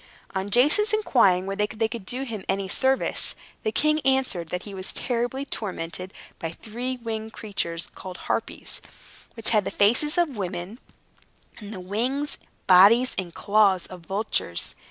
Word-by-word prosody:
On 190 +1 -2
Jason's 300 - +4
inquiring 200 - +4
whether 195 +2 0
they 225 +1 -1
could 225 -4 -7
do 255 +2 -2
him 225 -7 -5
any 195 0 0
service, 265 +7 +1 0.3
the 215 - -1
king 305 +6 +2
answered 260 - +1
that 180 +1 -3
he 205 - -9
was 190 -1 -3
terribly 245 +3 -2
tormented 185 -6 -5 0.3
by 165 - -3
three 240 +8 -5
great 240 -2 -17
winged 220 -1 -4
creatures, 170 -6 -3
called 185 -1 -8
Harpies, - - -3 0.5
which 225 - +2
had 215 -3 +4
the - - -2
faces 245 - +3
of 345 -2 +3
women, 185 +2 -4 0.8
and 210 -2 -8
the 200 - -6
wings, 245 +10 -2 0.3
bodies, 205 +7 +7
and 175 -3 -5
claws 200 -3 +3
of 185 -1 -10
vultures. 190 - -1
215 Hz, 155 wpm, -25 LUFS, 190-250 Hz, 0.8 s, bodies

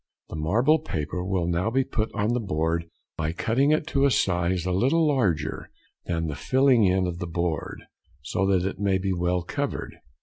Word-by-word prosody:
The - - -6
marble 115 - +2
paper 90 - -4
may 95 -2 -1
now 85 +4 0
be 130 +3 +2
put 110 -3 -2
on 105 +2 +1
the 125 - +1
board 85 -4 -1 0.3
by 80 +1 -1
cutting 120 - +1
it 155 0 +2
to 140 -2 +2
a - - +5
size 90 -5 +1
a 90 - 0
little 135 - +2
larger 115 - 0 0.4
than 80 -2 -1
the 75 - -3
filling 130 - +3
in 95 0 +2
of 90 -1 -4
the 90 - -4
board, 85 -1 -3 0.4
so 95 +7 -1
that 95 -1 +2
it 95 - -5
may 100 -2 +2
be 95 0 -1
well 90 0 0
covered. - - -4
95 Hz, 195 wpm, -25 LUFS, 85-115 Hz, 0.4 s, a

